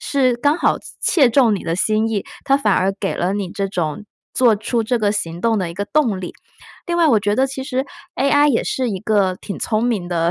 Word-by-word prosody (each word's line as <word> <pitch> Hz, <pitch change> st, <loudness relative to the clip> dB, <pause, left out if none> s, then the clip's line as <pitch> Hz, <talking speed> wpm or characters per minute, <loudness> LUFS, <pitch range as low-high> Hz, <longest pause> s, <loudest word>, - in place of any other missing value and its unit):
是 260 Hz, -4 st, +1 dB
刚 290 Hz, +6 st, +2 dB
好 -, -, +2 dB, 0.2 s
切 280 Hz, -8 st, +4 dB
中 235 Hz, -4 st, +4 dB
你 195 Hz, -, -5 dB
的 165 Hz, 0 st, -2 dB
心 215 Hz, +3 st, +1 dB
意， 210 Hz, -3 st, -2 dB, 0.2 s
它 275 Hz, 0 st, +3 dB
反 210 Hz, -8 st, +1 dB
而 190 Hz, +1 st, +1 dB
给 195 Hz, -, -1 dB
了 180 Hz, +2 st, -1 dB
你 200 Hz, -3 st, -3 dB
这 195 Hz, +1 st, -2 dB
种， 175 Hz, +2 st, -3 dB, 0.3 s
做 240 Hz, -4 st, +4 dB
出 225 Hz, +3 st, -1 dB
这 235 Hz, +2 st, 0 dB
个 205 Hz, -2 st, +1 dB
行 170 Hz, -4 st, -4 dB
动 230 Hz, -2 st, +1 dB
的 180 Hz, -3 st, -2 dB
一 170 Hz, -, -9 dB
个 200 Hz, +2 st, -3 dB
动 235 Hz, -8 st, 0 dB
力。 180 Hz, -, -6 dB, 0.5 s
另 345 Hz, 0 st, -1 dB
外 335 Hz, -2 st, +4 dB
我 230 Hz, -7 st, +4 dB
觉 205 Hz, 0 st, 0 dB
得 265 Hz, +1 st, +3 dB
其 265 Hz, 0 st, -6 dB
实 265 Hz, 0 st, -2 dB, 0.3 s
AI 290 Hz, +2 st, +3 dB
也 240 Hz, -, +2 dB
是 255 Hz, -3 st, -1 dB
一 190 Hz, -, -3 dB
个 205 Hz, -4 st, +1 dB
挺 200 Hz, -, -6 dB
聪 215 Hz, -1 st, -1 dB
明 210 Hz, -8 st, -1 dB
的 170 Hz, -1 st, 0 dB
215 Hz, 260 characters per minute, -19 LUFS, 195-260 Hz, 0.5 s, 切